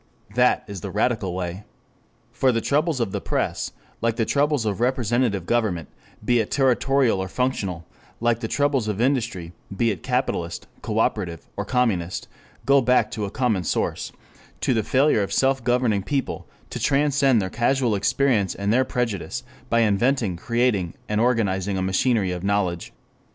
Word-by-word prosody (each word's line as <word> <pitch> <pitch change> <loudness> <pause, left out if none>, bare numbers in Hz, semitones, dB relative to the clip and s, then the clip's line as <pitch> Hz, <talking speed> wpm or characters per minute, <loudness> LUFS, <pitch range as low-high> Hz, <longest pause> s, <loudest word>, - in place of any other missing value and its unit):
That - - +3
is 100 -3 -7
the 100 - -5
radical 105 -1 0
way. 90 +2 -4 0.7
For 130 - +2
the 115 - 0
troubles 150 +4 +1
of 115 -5 -1
the - - -3
press, - - -2 0.3
like 115 -1 +1
the 115 - 0
troubles 145 -2 +1
of 105 +1 -2
representative 120 -5 +1
government, 100 -9 0 0.4
be 120 +1 +3
it 110 - -1
territorial 135 -4 +2
or 95 - -3
functional, 95 -7 -2 0.3
like 115 0 +1
the 115 - -3
troubles 140 -3 +1
of 105 -1 -2
industry, 115 -10 0 0.2
be 115 +1 +2
it 95 -5 -5
capitalist, 125 -10 -2 0.2
cooperative, 85 -3 -1
or 100 - -3
communist, 100 -8 0 0.4
go 140 0 +5
back 125 -3 +2
to 105 - -3
a - - -4
common 110 -5 0
source: - - -2 0.5
to - - +2
the 110 - +2
failure 130 +1 +3
of 100 - -2
self 135 -1 +2
governing 120 -4 +2
people 135 +7 -3 0.2
to - - -4
transcend 140 -3 +3
their 95 -2 -2
casual 120 0 +1
experience 105 0 +1
and 100 +2 0
their 130 +2 +4
prejudice, 120 -7 -3 0.3
by 115 0 +3
inventing, 110 -1 +2
creating, 115 -3 0
and 105 +1 0
organizing 100 -5 +1
a - - -1
machinery 95 +1 +1
of 90 0 -4
knowledge. 100 -4 -1
115 Hz, 160 wpm, -23 LUFS, 100-130 Hz, 0.7 s, go